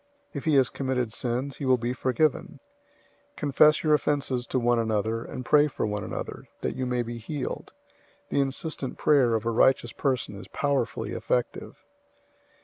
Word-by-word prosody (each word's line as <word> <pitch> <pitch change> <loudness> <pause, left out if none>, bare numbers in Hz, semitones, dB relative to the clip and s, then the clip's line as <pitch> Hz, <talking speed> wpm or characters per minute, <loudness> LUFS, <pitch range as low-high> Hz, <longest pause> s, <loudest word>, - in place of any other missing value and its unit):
If 140 - -5
he 155 -2 +3
has 130 -3 +4
committed 125 -4 -2
sins, 125 +4 -3
he 140 - -4
will 130 -1 +4
be 120 +1 -2
forgiven. 130 +3 0 0.7
005:016 - - -41
Confess 150 +2 +4
your 155 -1 +4
offenses 140 -4 0
to - - -1
one 120 -1 +2
another, 110 0 0
and 125 - -7
pray 150 0 +5
for 140 - -3
one 105 -1 -2
another, - - -6
that - - -2
you 130 -1 -2
may 125 -1 0
be 120 0 -6
healed. 135 +4 -5 0.6
The 140 - +2
insistent 135 0 -3
prayer 130 -6 +4
of 110 0 -2
a 115 - +1
righteous 120 0 +3
person 130 -7 -1
is 100 - -10
powerfully 140 -6 -1
effective. 125 -1 -2
130 Hz, 170 wpm, -27 LUFS, 120-140 Hz, 0.7 s, pray